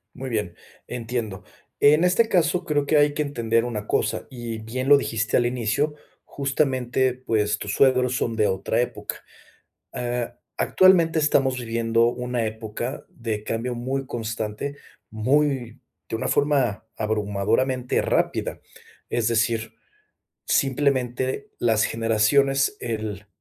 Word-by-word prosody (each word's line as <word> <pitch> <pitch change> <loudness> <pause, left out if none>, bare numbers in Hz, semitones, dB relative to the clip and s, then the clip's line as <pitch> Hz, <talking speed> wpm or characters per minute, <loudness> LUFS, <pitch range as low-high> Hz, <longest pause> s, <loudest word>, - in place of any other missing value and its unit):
Muy 130 0 -6
bien, 105 -6 -2 0.3
entiendo, 115 -4 -4 0.4
en 150 +3 +5
este 205 +6 +3
caso, 175 0 +2
creo 145 -3 +1
que 155 - +3
hay 145 0 +4
que 150 - +1
entender 115 -4 0
una 105 -4 -4
cosa - - 0
y 120 -3 -6
bien 125 +4 -4
lo 145 - +8
dijiste 115 -5 0
al 120 - +3
inicio, 125 +5 0 0.3
justamente, 130 -2 0
pues, 110 -5 0
tus 105 - -4
suegros 130 -2 +3
son 115 -1 -1
de 110 -1 +2
otra 95 +4 -1
época, 120 - -3 0.7
ah, 120 -1 -3 0.2
actualmente 170 -4 +4
estamos 135 -4 +2
viviendo 115 0 +1
1 125 -1 -1
época 110 +4 -5
de 110 -3 -4
cambio 120 +3 -2
muy 135 +3 -2
constante, 115 +3 -4 0.3
muy 130 +1 0 0.3
de - - -2
una - - -3
forma 135 -8 +1
abrumadoramente 110 +4 0
rápida. - - 0 0.5
Es 120 -1 0
decir, 115 -1 0 0.7
simplemente 130 - 0
las 110 -2 +2
generaciones, 125 - +2
el 110 -3 -4
120 Hz, 125 wpm, -24 LUFS, 110-140 Hz, 0.7 s, lo